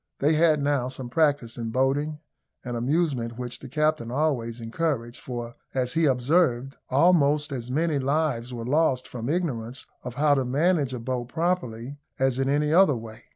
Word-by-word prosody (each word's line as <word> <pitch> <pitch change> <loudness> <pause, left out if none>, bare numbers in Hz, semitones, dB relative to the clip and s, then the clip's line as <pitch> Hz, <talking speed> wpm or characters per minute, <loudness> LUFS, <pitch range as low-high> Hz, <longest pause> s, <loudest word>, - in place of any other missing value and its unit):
They 150 +3 +2
had 155 -1 +4
now 140 -3 +1
some 130 -1 -6
practice 145 -5 +1
in 115 -1 -3
boating, 135 +5 0 0.5
an 120 -1 -3
amusement 125 -2 0
which 125 -1 -5
the 135 - -10
captain 150 -3 0
always 125 -4 -1
encouraged; 120 0 -2
for, 120 -2 -5 0.2
as 125 -1 0
he 165 0 +2
observed, 135 0 +2
almost 150 0 +3
as 125 -3 -5
many 155 +2 +1
lives 135 -3 0
were 115 -2 -5
lost 135 -2 +2
from 120 0 -5
ignorance 130 -8 -2 0.2
of 125 -1 -7
how 145 +2 +4
to 135 -2 +2
manage 140 +1 +1
a - - -5
boat 125 0 -3
properly, 145 -6 -2 0.2
as 130 -1 +1
in 135 0 +1
any 150 +2 +2
other 180 -5 +6
way. 115 0 -9
135 Hz, 170 wpm, -26 LUFS, 120-150 Hz, 0.5 s, other